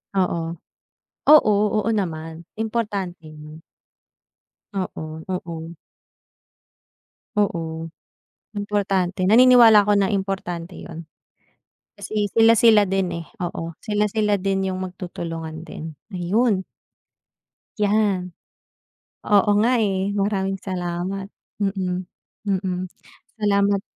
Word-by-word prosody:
Oo. 170 -3 0 0.7
Oo, 295 -8 +7 0.3
oo 225 - 0
naman. 165 -5 -3
Importante 205 -7 -3
'yon. 155 0 -11 1.1
Oo, 185 -4 -4 0.3
oo. 170 -2 -5 1.6
Oo. 165 -5 -1 0.6
Importante, 195 -3 -1
naniniwala 230 -1 +8
ako 205 -1 +3
na 195 -1 +2
importante 190 -3 -3
'yon. 165 0 -9 0.9
Kasi, 210 -1 -2
sila-sila 225 -1 +6
din, 195 -1 0 0.2
eh, - - -22
oo, 170 -1 -4
sila-sila 210 0 +1
din 195 0 -1
'yong 185 - -3
magtutulungan 165 -3 -6
din. 155 -1 -8 0.2
Ayun. 190 +3 +1 1.2
'Yan. 205 -1 +2 1.1
Oo 205 0 +5
nga, 240 +3 +3
eh. 195 -2 0 0.2
Maraming 195 -1 0
salamat. 185 +1 -3 0.3
Mm, 185 -2 -1 0.5
mm. 190 -1 0 0.6
Salamat. 200 -1 +2
195 Hz, 90 wpm, -22 LUFS, 175-205 Hz, 1.6 s, naniniwala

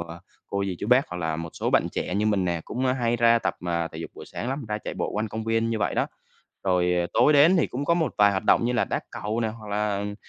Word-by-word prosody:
ờ, 85 0 -8 0.3
cô 100 0 -2
dì, 95 -2 -3
chú - - -4
bác, 125 +4 +4
hoặc 90 - -6
là 80 -2 -2
một 85 0 -5
số - - -2
bạn - - +3
trẻ 90 - -3
như 105 +1 +1
mình 100 -3 +2
nè 85 -2 -1
cũng, 130 +3 -2
ơ, 125 - +3
hay 120 -2 0
ra 115 0 +5
tập, - - -1
ờ, 85 -1 -1
thể 80 - -8
dục 85 - -6
buổi - - -10
sáng 120 - -5
lắm, 135 0 -3
ra 105 0 -2
chạy - - -6
bộ - - -2
quanh 110 +1 -1
công 110 +2 -5
viên 115 0 +1
như 115 - -1
vậy - - 0
đó. - - +1 0.6
Rồi 90 -2 +2 0.2
tối 150 - +5
đến 155 +6 +6
thì 165 - +2
cũng 135 +3 -4
có 170 - +3
một 160 -7 0
vài 105 0 +6
hoạt 95 -1 -2
động - - +4
như 125 - 0
là 120 - +2
đá - - -2
cầu 105 0 -3
nè, 115 - 0
hoặc 110 -1 -8
là, 105 0 0
ừm, 100 0 -4
105 Hz, 305 wpm, -25 LUFS, 95-120 Hz, 0.6 s, đến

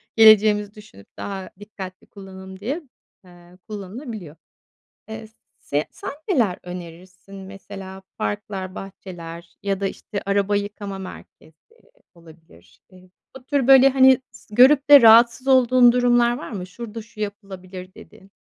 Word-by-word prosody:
geleceğimizi 215 -2 +5
düşünüp 210 - -16
daha 195 -2 -6
dikkatli 195 -3 -10
kullanım 190 -1 -12
diye, 275 +11 -4 0.4
eee, 175 0 -18
kullanılabiliyor. 205 - -8 0.7
Eee, 220 0 -8
s 220 - -31 0.2
se 145 +2 -2
sen - - -7 0.2
neler 230 - +1
önerirsin? 180 +2 -11
Mesela 195 0 -10
parklar, 200 -3 -5
bahçeler 170 -3 -10
ya 195 -1 -1
da 200 - -1
işte, 200 +1 -7
araba 200 +1 0
yıkama 200 -1 -5
merkezi 160 -4 -12 0.6
olabilir. 160 - -20
Eee, 185 0 -19 0.3
bu 260 - -12
tür, 275 -3 0
böyle, 270 0 +8
hani, 265 -1 +5
s 210 - -15
görüp 270 +2 +5
de 285 -1 +10
rahatsız 235 +3 +6
olduğun 255 -2 +5
durumlar 240 0 +2
var - - -9
mı, 185 -4 -6
"Şurada 225 +3 -8
şu 215 0 -18
yapılabilir." 190 -3 -8
dediğin? 195 +1 -17
200 Hz, 135 wpm, -22 LUFS, 185-230 Hz, 0.7 s, de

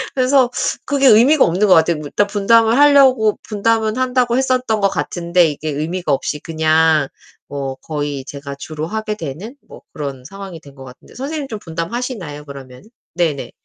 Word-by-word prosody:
그래서 255 -1 +3 0.4
그게 275 -2 +2
의미가 255 +7 +6
없는 190 +5 +1
것 185 - +6
같아요. 165 0 +3
일단 200 +8 0
분담을 225 +3 +3
하려고 270 -7 +5
분담은 220 +1 0
한다고 250 -1 +1
했었던 255 -4 0
것 195 - +3
같은데 175 -1 0
이게 150 +1 -5
의미가 155 +3 -3
없이 145 +2 -1
그냥 160 -2 +2 0.4
뭐 140 -2 -5
거의 145 -2 -5
제가 140 0 -8
주로 155 +2 -6
하게 215 +1 -3
되는 170 - -7
뭐 - - -13
그런 140 -4 -6
상황이 195 +1 -9
된 145 - -16
것 135 - -12
같은데. 125 0 -15
선생님 285 +2 -4
좀 215 -5 -6
분담하시나요, 170 - -5
그러면은? 135 +5 -12 0.3
네네. 160 -6 -1
185 Hz, 360 characters per minute, -18 LUFS, 150-235 Hz, 0.4 s, 의미가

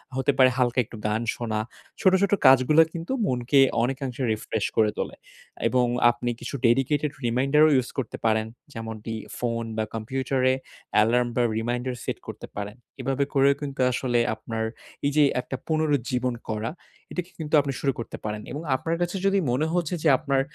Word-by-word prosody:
হতে 130 +2 +2
পারে 130 -1 +7
হালকা 125 0 +2
একটু 115 - -11
গান 110 +2 0
শোনা। 110 -3 -2 0.4
ছোট, 190 -4 +5
ছোট 200 - +2 0.2
কাজগুলা 135 +5 +7
কিন্তু 170 +8 -4
মনকে 125 +2 +2 0.2
অনেকাংশে 130 0 -2
রিফ্রেশ 110 0 -2
করে 110 -1 +4
তোলে। - - -3 0.5
এবং 125 -1 +3 0.3
আপনি 120 +1 -4
কিছু - - -5
ডেডিকেটেড 135 +5 +2
রিমাইন্ডারও 135 +6 +4
ইউস 130 -1 +1
করতে 125 -5 -3
পারেন। 110 0 +2 0.3
যেমনটি 110 0 -6 0.2
ফোন 115 -1 -1
বা 110 - +1
কম্পিউটারে 130 +3 0 0.5
এলার্ম 120 +3 +3
বা 125 - +2 0.2
রিমাইন্ডার 120 +2 -2
সেট - - -3
করতে - - -7
পারেন। 105 +1 -5 0.3
এভাবে 135 +2 0
করেও 140 0 +4
কিন্তু 140 -2 -5
আসলে 120 -1 0 0.2
আপনার 110 0 -4 0.4
এই 140 - +2
যে, 150 - +6 0.2
একটা 130 - -6
পুনরুজ্জীবন 140 -6 0 0.2
করা। 110 +3 -2 0.4
এটাকে 180 0 -4
কিন্তু 155 -1 -6
আপনি 135 -1 -3
শুরু 140 - +1
করতে 115 - -6
পারেন। 105 0 -3
এবং 150 - -4
আপনার 165 +5 -1
কাছে 175 +2 -1
যদি 195 0 +3
মনে 150 +6 +1
হচ্ছে 175 0 0
যে, 160 - +3
আপনার 140 -3 +1
130 Hz, 165 wpm, -25 LUFS, 115-145 Hz, 0.5 s, পারে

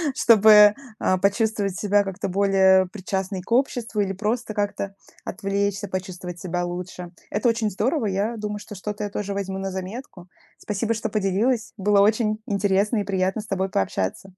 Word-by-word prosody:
чтобы, 210 -2 +7 0.2
а, 185 - +2
почувствовать 200 -1 0
себя 205 0 +3
как-то 195 -1 -4
более 190 -1 +4
причастной 190 0 -4
к 190 - -17
обществу 235 -4 +1
или 195 -1 -1
просто 220 +3 -2
как-то 200 -1 -3 0.3
отвлечься, 200 0 -2
почувствовать 185 -1 -6
себя 175 0 -2
лучше. 180 0 -6 0.2
Это 240 - +1
очень 225 -2 0
здорово. 240 - 0
Я 205 +4 -1
думаю, 210 -1 -4
что 210 0 -10
что-то 210 +2 -5
я 205 - -2
тоже 200 0 -4
возьму 195 -1 -3
на 195 0 -3
заметку. 190 0 -7 0.3
Спасибо, 210 +2 -2
что 225 - -3
поделилась. 215 +4 0
Было 200 0 +3
очень 215 0 +2
интересно 200 +2 +1
и 205 - 0
приятно 190 +1 -1
с 210 - -13
тобой 190 -1 -1
пообщаться. 95 - -2
200 Hz, 165 wpm, -23 LUFS, 190-215 Hz, 0.3 s, чтобы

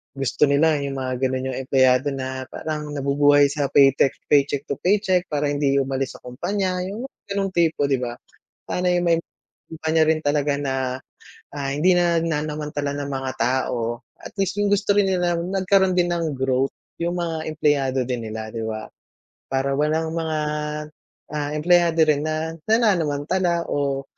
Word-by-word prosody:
gusto 135 +1 0
nila 150 +1 +3
'yung 140 -1 -3
mga 130 -1 -2
ganun 130 0 -3
'yung - - -5
empleyado 130 0 +4
na 130 -1 -5
parang 150 -1 -5
nabubuhay 145 0 +4
sa 145 -1 -1
paytek 135 -1 +4 0.2
paycheck 145 -1 +3
to 140 -2 -4
paycheck 185 0 +2
para 145 -1 -1
hindi 145 -1 +1
umalis 135 -1 -1
sa - - -26
kumpanya 180 +9 -2
'yung 210 +5 -5 0.2
ganong 200 -1 -1
tipo 165 -4 +1
'di 135 -2 +1
ba? 120 -1 -4 0.5
Sana 180 0 0
'yung 175 0 +1
may 165 -1 +4 0.5
kumpanya 160 0 +1
rin 160 0 +3
talaga 145 -1 +1
na, 135 -2 -1 0.8
ah, 140 -1 -2
hindi 155 +7 +3
nananamantala 155 -4 0
ng 140 - -4
mga 135 -1 -3
tao. 120 -1 -1 0.2
At - - -11
least 195 +1 -1
'yung 205 0 +1
gusto 205 0 +1
rin 205 -1 +4
nila 175 -2 +1
nagkaroon 190 +1 +2
din 175 -1 +2
ng 165 -3 -1
growth, 130 0 0 0.3
'yung 170 +1 -1
mga 165 -2 -2
empleyado 145 -4 +1
din 120 -3 -3
nila, 110 0 -5
'di 115 -1 -4
ba? 110 -1 -5 0.6
Para 135 +1 0
walang 160 +2 0
mga, 160 -2 -1 0.9
ah, 145 -1 -2
empleyado 170 +1 +3
rin 150 -2 +2
na 155 +1 -2 0.2
nananamantala 175 -5 +1
o 140 -1 -1
150 Hz, 160 wpm, -23 LUFS, 135-170 Hz, 0.9 s, empleyado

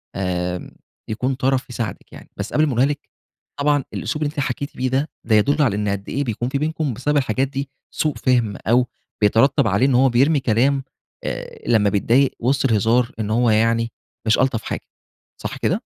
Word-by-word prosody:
آمم، 90 -2 -2 0.4
يكون 125 +5 -1
طرف 130 0 0
يساعدِك 115 -5 -5
يعني، - - -12
بس - - -5
قبل 155 - +4
ما - - -1
أقولها 125 +1 +3
لِك. 145 0 -4 0.5
طبعًا 145 -1 +2
الأسلوب 150 - -2
اللي 145 - -1
أنتِ 150 - -5
حكيتِ 140 +1 -3
بيه 130 +1 0
ده 135 +4 0
ده 110 -1 +2
يدل 140 +8 +3
على 120 -8 +2
إن 105 0 -1
قد 100 0 -3
إيه 140 - -1
بيكون 120 -1 -2
في 140 - -1
بينكم 155 -2 -1
بسبب 145 +6 0
الحاجات 130 0 +1
دي 135 0 -4 0.2
سوء 150 -2 -1
فهم 120 -5 +1
أو 125 +2 +4 0.3
بيترتب 110 +4 +4
عليه 100 +5 +3
إن 135 -2 +3
هو 130 +2 +5
بيرمي 140 +5 +3
كلام 135 +3 +2 0.4
آآ، - - -5
لمّا 110 -3 +4
بيتضايق 120 +7 +3
وسط 135 +3 +1
الهزار 115 +3 +2
إن 105 -1 -2
هو 120 +2 +3
يعني 115 +1 +2 0.4
مش 110 - +4
ألطف 130 -4 +1
حاجة، - - -4 0.6
صح - - -4
كده؟ - - 0
125 Hz, 190 wpm, -21 LUFS, 110-140 Hz, 0.6 s, هو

